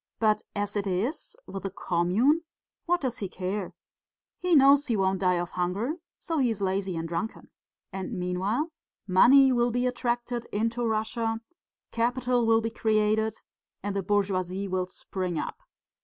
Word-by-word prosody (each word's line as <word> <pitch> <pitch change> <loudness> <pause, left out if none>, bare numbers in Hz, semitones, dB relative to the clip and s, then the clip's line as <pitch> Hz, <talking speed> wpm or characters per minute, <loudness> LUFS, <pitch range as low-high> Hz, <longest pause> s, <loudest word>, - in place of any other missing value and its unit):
But 215 -1 +2
as 205 0 -2
it 205 -1 -1
is, 195 - -2
with 195 - -6
the 195 - -3
commune, 190 - +2 0.5
what 355 +1 +2
does 255 -2 -2
he 195 - -3
care? 185 +1 -4 0.6
He 360 -2 +2
knows 280 +1 +6
he 230 -4 +1
won't 190 -1 +1
die 180 -1 +3
of 175 +1 -3
hunger, 195 - -1 0.2
so 325 -3 -2
he 255 -3 +3
is 220 -3 -2
lazy 190 -1 -1
and 165 0 -3
drunken. 175 +7 -4 0.4
And 190 +2 -4
meanwhile 190 - -1 0.3
money 260 +8 +6
will 240 -1 +2
be 245 +1 0
attracted 240 -1 -2
into 230 +3 -1
Russia, 225 0 -1 0.5
capital 245 0 +1
will 225 0 +5
be 225 0 -2
created 220 0 +1 0.5
and 200 0 -2
the 195 - 0
bourgeoisie 195 -1 0
will 185 -1 -1
spring 185 -2 -4
up. - - -4
215 Hz, 155 wpm, -27 LUFS, 190-245 Hz, 0.6 s, knows